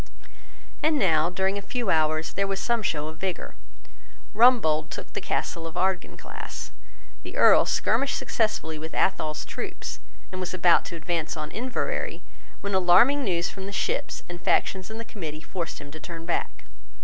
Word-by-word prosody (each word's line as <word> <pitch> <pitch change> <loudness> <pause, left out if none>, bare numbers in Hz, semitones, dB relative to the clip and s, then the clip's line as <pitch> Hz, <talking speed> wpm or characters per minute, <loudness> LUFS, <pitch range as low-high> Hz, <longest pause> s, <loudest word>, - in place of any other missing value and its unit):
And 310 0 +3
now, 165 - +3
during 190 +2 0
a - - -8
few 245 -1 -2
hours, 155 0 +2
there 200 0 0
was 195 0 -2
some 235 -1 +1
show 155 -6 -1
of 160 0 -8
vigour. 190 0 -3 0.8
Rumbold 210 -11 +5
took - - -7
the - - -3
castle 165 -1 -2
of 165 - -9
Ardkinglass. 190 -1 -3 0.5
The - - -8
Earl - - +7
skirmished 275 - +2
successfully 160 -8 -1
with 160 +1 -7
Athol's 155 -5 0
troops, - - -5 0.3
and 185 - -5
was 185 0 -3
about 175 -1 +5
to 170 - -6
advance 165 0 -2
on 150 -1 -4
Inverary, 250 +2 -2 0.4
when 200 0 -3
alarming 190 +10 +5
news 175 -5 0
from 190 0 -7
the - - -5
ships 200 - -2
and 175 0 -8
factions 190 0 +1
in 220 - -6
the 230 - -6
Committee 160 -9 -6
forced 170 -1 -5
him 145 0 -10
to 155 - -9
turn 165 -1 -8
back. 170 - -2
180 Hz, 170 wpm, -26 LUFS, 160-200 Hz, 0.8 s, Earl